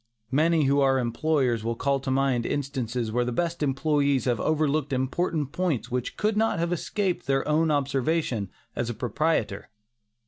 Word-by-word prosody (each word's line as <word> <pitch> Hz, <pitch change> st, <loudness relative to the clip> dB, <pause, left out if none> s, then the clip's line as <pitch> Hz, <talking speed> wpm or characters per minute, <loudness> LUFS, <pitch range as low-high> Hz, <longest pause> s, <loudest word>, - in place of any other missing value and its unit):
Many 160 Hz, +3 st, +3 dB
who 140 Hz, +1 st, +3 dB
are 135 Hz, -1 st, +4 dB
employers 125 Hz, -1 st, 0 dB
will 115 Hz, +1 st, -1 dB
call 140 Hz, +3 st, 0 dB
to 135 Hz, -, -5 dB
mind 130 Hz, -2 st, +1 dB
instances 125 Hz, -4 st, -2 dB
where 120 Hz, +2 st, +1 dB
the 125 Hz, -, -2 dB
best 170 Hz, +6 st, -2 dB
employees 140 Hz, -1 st, +1 dB
have 120 Hz, -4 st, +1 dB
overlooked 155 Hz, -2 st, +1 dB
important 145 Hz, +3 st, -1 dB
points 170 Hz, -11 st, -1 dB
which 125 Hz, 0 st, -3 dB
could 215 Hz, 0 st, +1 dB
not 220 Hz, -2 st, +2 dB
have 170 Hz, +1 st, 0 dB
escaped 185 Hz, -2 st, -2 dB
their 135 Hz, 0 st, +1 dB
own 155 Hz, +2 st, +2 dB
observation 140 Hz, -, 0 dB, 0.3 s
as 120 Hz, -, -2 dB
a 120 Hz, -, -3 dB
proprietor. 125 Hz, -3 st, -1 dB
140 Hz, 165 wpm, -26 LUFS, 125-155 Hz, 0.3 s, are